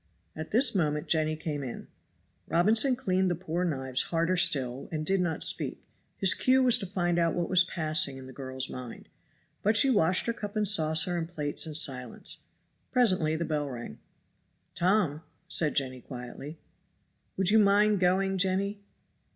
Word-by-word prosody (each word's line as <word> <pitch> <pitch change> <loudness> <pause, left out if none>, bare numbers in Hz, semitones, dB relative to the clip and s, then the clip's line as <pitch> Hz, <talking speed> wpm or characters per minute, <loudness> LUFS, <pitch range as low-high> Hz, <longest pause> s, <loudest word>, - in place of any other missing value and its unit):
At 160 0 -7
this 240 +2 +3
moment 150 -6 -1
Jenny 155 -1 +1
came 155 -2 -4
in. 125 -4 -7 0.6
Robinson 220 +9 +3
cleaned 190 -7 0
the 175 - 0
poor 175 0 -3
knives 130 -6 -1
harder 165 +2 +1
still 135 -7 +1
and 155 -1 -3
did 195 +2 +1
not 170 -3 -1
speak; - - -4 0.3
his 195 -2 +5
cue 260 +1 +3
was 245 -1 +3
to 195 - -5
find 175 -2 -1
out 165 -1 +1
what 175 0 -2
was 180 -1 +6
passing 155 -6 0
in 130 - -10
the 130 - -11
girl's 130 -1 -4
mind. 125 -2 -9 0.5
But 210 +1 +3
she 270 +1 +5
washed 180 -5 +3
her 235 - -1
cup 205 -2 -7
and 210 -1 +2
saucer 165 -2 +3
and 165 0 -5
plates 150 -2 -3
in 155 - -7
silence. 130 -6 -1 0.5
Presently 185 -11 +2
the 170 +1 -2
bell 150 -2 -2
rang. 120 - -8 0.7
"Tom!" 180 -5 +1 0.3
said 155 -3 0
Jenny 130 -2 -1
quietly. 130 +5 -9 0.8
"Would 190 +1 +2
you 220 - +5
mind 205 0 +4
going, 190 +1 +1
Jenny?" 195 +2 -1
170 Hz, 165 wpm, -28 LUFS, 150-195 Hz, 0.8 s, was